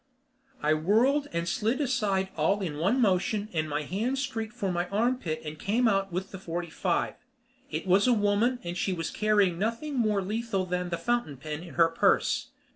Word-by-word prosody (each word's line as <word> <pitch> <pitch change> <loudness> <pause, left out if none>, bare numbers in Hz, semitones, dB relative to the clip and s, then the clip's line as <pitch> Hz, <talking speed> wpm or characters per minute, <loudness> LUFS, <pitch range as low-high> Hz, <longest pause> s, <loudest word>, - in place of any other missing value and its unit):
I 155 - +4
whirled 230 - +2
and 170 0 -2
slid 230 +6 0
aside 210 -9 0
all 180 +6 +1
in 155 -6 -3
one 200 +11 +2
motion 205 0 +1
and 155 -1 -1
my 150 +1 -1
hand 220 - -1
streaked 235 -5 -3
for 200 -6 -1
my 175 0 -1
armpit 215 -6 0
and 150 0 -6
came 230 +4 +2
out 195 -2 +1
with 185 +3 -4
the 190 - -7
forty 170 -2 -4
five. 175 0 0 0.6
It - - -3
was 190 +5 +4
a - - +5
woman 210 +4 +2
and 175 0 -4
she 185 +2 0
was 165 -2 -3
carrying 205 -5 +2
nothing 230 +8 -2
more 210 -4 +2
lethal 210 -1 -1
than 180 0 -2
the 170 - -2
fountain 235 - -1
pen 150 +3 -5
in 175 -1 -11
her 165 -1 +5
purse. 165 - +2
195 Hz, 195 wpm, -28 LUFS, 170-225 Hz, 0.6 s, a